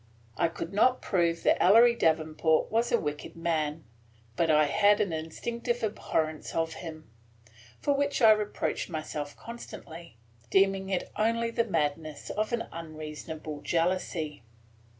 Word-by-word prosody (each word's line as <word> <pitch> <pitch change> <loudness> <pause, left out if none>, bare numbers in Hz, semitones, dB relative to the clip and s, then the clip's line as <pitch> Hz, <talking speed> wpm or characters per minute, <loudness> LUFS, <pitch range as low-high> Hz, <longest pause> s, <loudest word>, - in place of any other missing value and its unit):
I 170 - +2
could 165 +2 -6
not 250 +5 +3
prove 170 -3 +1
that - - +3
Ellery 230 +5 +7
Davenport 160 -4 +1
was 230 +2 +1
a 235 - +4
wicked 150 -1 -5
man 160 -2 -1 0.5
but 165 +4 +1
I 155 -1 +5
had 205 +7 +4
an 185 -5 0
instinctive 235 +10 -3
abhorrence 160 -7 -2
of 165 0 0
him, 155 -6 -9 0.7
for 285 - +1
which 280 0 0
I 225 -3 +8
reproached 210 -2 -1
myself 150 -3 -5
constantly, 170 - -10 0.3
deeming 195 0 +3
it 190 -2 -2
only 230 +2 +1
the 230 0 +1
madness 155 -5 -2
of 215 +2 -1
an 235 -1 0
unreasonable 155 -1 -7
jealousy. 165 -3 -1
170 Hz, 135 wpm, -29 LUFS, 155-215 Hz, 0.7 s, I